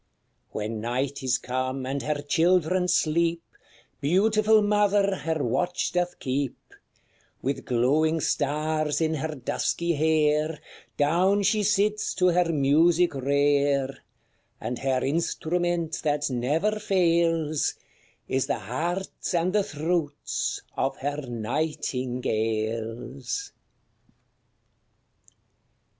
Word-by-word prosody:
When 110 +1 -4
night 130 +4 -2
is 130 -2 +1
come, 130 +1 -3
and 135 +1 -2
her 150 -1 -2
children 180 +3 +2
sleep, 165 0 +1 0.6
Beautiful 215 +7 +3
mother 205 -1 +3
her 160 -3 -2
watch 175 +10 0
doth 180 0 -1
keep; 135 0 -2 0.9
With 135 +2 -2
glowing 150 +7 +2
stars 155 +1 0
in 160 -1 +1
her 155 +1 -3
dusky 170 +6 -1
hair 155 0 +2 0.4
Down 180 +7 +3
she 215 +2 +2
sits 210 +1 +1
to 185 -1 +3
her 175 -1 +2
music 160 +4 +3
rare; 140 0 +1 0.6
And 125 - -4
her 130 -2 0
instrument 170 +2 -1
that 150 -2 0
never 155 - 0
fails, 165 -5 +1 0.5
Is 135 0 0
the 140 - 0
hearts 170 - -3
and 175 +2 +1
the 210 - +4
throats 155 -3 -2
of - - -1
her 145 +2 -3
nightingales. 120 - -2
155 Hz, 100 wpm, -26 LUFS, 135-175 Hz, 0.9 s, the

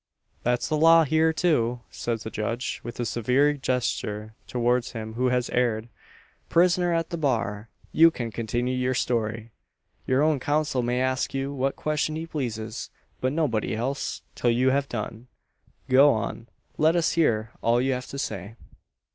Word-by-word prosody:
"That's 120 0 0
the 155 - 0
law 165 +1 +7
here, 160 +2 +3
too," 125 -8 +1
says 115 -2 -3
the 110 - -6
judge, 115 +4 -3
with 120 0 -8
a 120 - 0
severe 125 +6 +2
gesture 115 -5 -2
towards 125 0 0
him 110 -1 -6
who 125 +3 0
has 125 -1 +1
erred. 120 -2 0 0.6
"Prisoner 175 0 +3
at 165 0 -1
the 170 - -2
bar! 115 -7 -1 0.2
you 165 +1 +7
can 120 -8 -5
continue 120 +3 -2
your 125 0 0
story. 115 -2 -1 0.6
Your 130 +3 +3
own 155 -2 +2
counsel 145 -1 0
may 125 +1 0
ask 130 +1 -1
you 135 +1 -2
what 135 0 -1
question 155 0 -1
he 160 +1 -4
pleases; 115 -8 -4 0.3
but 130 - 0
nobody 135 -10 0
else, 130 +5 -3
till 120 - 0
you 125 +3 +3
have 140 +1 0
done. 115 +1 -5 0.6
Go 135 +3 +6
on! 115 0 -3 0.3
Let 160 +2 +4
us 170 -2 +2
hear 115 -9 +1
all 120 +1 +3
you 130 +1 +1
have 125 0 -4
to 140 - -7
say." 105 -5 -4
125 Hz, 165 wpm, -26 LUFS, 115-145 Hz, 0.6 s, law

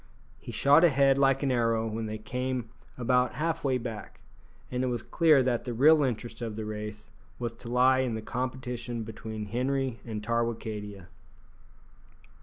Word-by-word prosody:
He - - -8
shot 145 +4 +5
ahead 140 -4 +4
like 135 0 +3
an 135 - +1
arrow 115 -2 +1
when 110 0 -3
they 110 0 -4
came 125 +1 -3 0.3
about 125 +1 +2
half 165 +3 -1
way 130 -2 +2
back, 115 -4 -7 0.5
and 125 0 -1
it - - +1
was 120 -3 -2
clear 155 -5 +4
that 125 -2 0
the 120 -2 -4
real 150 +5 +6
interest 120 -3 -2
of 115 -3 -4
the 110 0 -4
race 105 0 -6 0.3
was 120 -2 -3
to 115 +1 -12
lie 130 +2 +4
in 125 -3 0
the 110 - -4
competition 125 -1 -4
between 110 0 -6
Henri 130 +2 -1
and 110 -3 -5
Tarwicadia. 110 -4 -3
120 Hz, 165 wpm, -28 LUFS, 110-130 Hz, 0.5 s, real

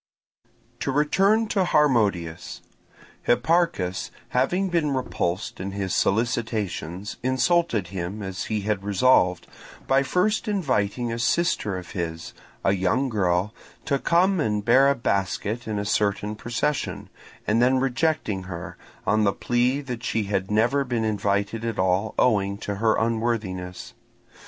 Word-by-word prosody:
To - - -1
return 195 +10 +3
to 195 - +2
Harmodius; 105 - +1 0.6
Hipparchus 140 - +1 0.2
having 180 +10 +1
been 155 -5 +1
repulsed 100 -7 -2
in 95 +1 -4
his 95 -3 -2
solicitations 105 -4 -1
insulted 130 - +1
him 95 +2 -5
as 95 -1 -4
he 110 -2 -2
had 100 -1 -1
resolved, 100 -3 +3 0.4
by 135 0 +3
first 180 - 0
inviting 125 - 0
a 115 - -4
sister 120 - +1
of 90 - -9
his, 85 -2 -5 0.3
a 95 - +4
young 100 +8 +1
girl, 95 -1 0 0.3
to 140 -2 +1
come 180 +5 +3
and 105 -7 0
bear 135 +4 +6
a 140 - +2
basket 105 +1 -2
in 110 -1 -2
a 100 - -2
certain 105 +1 0
procession, 120 +6 -2 0.4
and 110 +2 +2
then 130 +2 +4
rejecting 130 - 0
her, 85 -2 -7 0.3
on 105 +2 +2
the 100 - +3
plea 125 +3 +1
that 125 -4 -6
she 115 -2 0
had 100 -1 -2
never 120 +7 +2
been 120 -3 -2
invited 105 +1 -1
at 115 -2 -3
all 95 +3 +1
owing 100 -5 +2
to 100 -1 -4
her 110 +1 +2
unworthiness. 110 -6 -2
110 Hz, 135 wpm, -24 LUFS, 100-130 Hz, 0.6 s, bear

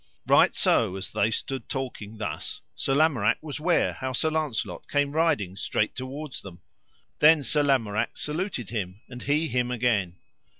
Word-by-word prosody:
Right - - +5
so 90 - +3
as 95 - -5
they 105 - +2
stood 130 +2 -3
talking 115 -5 -5
thus 80 -7 -4
Sir 135 - 0
Lamorak 135 -8 +3
was 150 -2 -5
ware 170 +3 +2
how 130 0 -4
Sir 155 +5 +1
Launcelot 155 -7 -2
came 145 -1 +1
riding 145 - +1
straight 105 +1 -1
toward 135 +2 -6
them; 90 -3 -12 0.6
then 150 -1 +6
Sir 145 +4 +2
Lamorak 115 -6 +1
saluted 150 - -3
him, 100 -3 -4
and 125 -1 -9
he 150 +3 +1
him 125 -1 0
again. 110 -8 0
130 Hz, 160 wpm, -26 LUFS, 105-150 Hz, 0.6 s, then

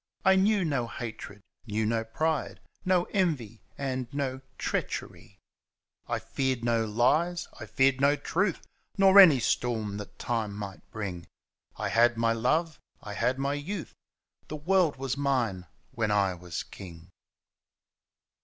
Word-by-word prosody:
I 190 0 +6
knew 195 0 +3
no 135 -6 0
hoitred^ 110 -4 -7 0.3
knew 110 +1 -1
no 115 +1 0
pride^ 155 +7 -1 0.3
No 185 -2 +3
envy 145 - -1 0.2
and 130 -3 -3
no 135 -2 -3 0.2
treachery, - - -4 0.7
I - - -1
feared 130 -3 -2
no 115 -1 +2
lies, 150 +11 +1
I 110 - -7
feared 130 +4 +2
no 140 +1 +5
truths 180 +5 -1 0.3
Nor 195 0 +7
any 165 -9 +9
storm 110 -4 -1
thtU 105 - -7
time 115 -4 -2
might 100 -2 -7
brtng. 95 -6 -5 0.5
I - - -2
had 120 0 +4
my 115 0 +2
love, 150 +6 0 0.2
I 105 - -6
had 125 +5 0
my 140 +1 -1
youths 160 +5 -5 0.5
The 155 - -5
world 170 +1 +2
was 135 0 -3
mine 120 -10 0 0.2
when 110 -2 -1
I 100 -2 +2
was 90 -2 -6
king. 85 -3 -12
125 Hz, 140 wpm, -28 LUFS, 110-155 Hz, 0.7 s, any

